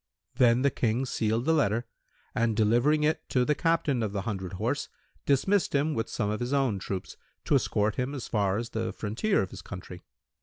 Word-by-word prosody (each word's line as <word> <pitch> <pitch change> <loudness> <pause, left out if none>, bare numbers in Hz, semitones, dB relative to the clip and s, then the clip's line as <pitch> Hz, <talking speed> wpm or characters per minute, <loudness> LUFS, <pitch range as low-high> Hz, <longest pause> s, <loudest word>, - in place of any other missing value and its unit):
Then 125 -1 +4
the 140 - +3
King 120 +2 0
sealed 115 -1 0
the 160 - +3
letter 120 -6 +1 0.5
and 115 -1 +1
delivering 120 +8 +3
it 155 +1 0
to 125 -1 +2
the 150 - +3
Captain 160 -5 +1
of 105 -3 -2
the 100 -2 -2
hundred 95 -4 -4
horse, 90 - -2 0.4
dismissed 175 +7 +2
him 150 +3 +2
with 115 -3 -2
some 105 -3 -1
of 105 - -2
his 125 +2 -2
own 130 -8 +1
troops, 95 0 -5 0.3
to - - +1
escort 105 0 +1
him 130 +3 -2
as 130 - -5
far 100 -3 +1
as 115 +1 -4
the 115 0 -2
frontier 115 - 0
of 95 - -7
his - - -8
country. 90 -1 -9
115 Hz, 200 wpm, -28 LUFS, 105-140 Hz, 0.5 s, Then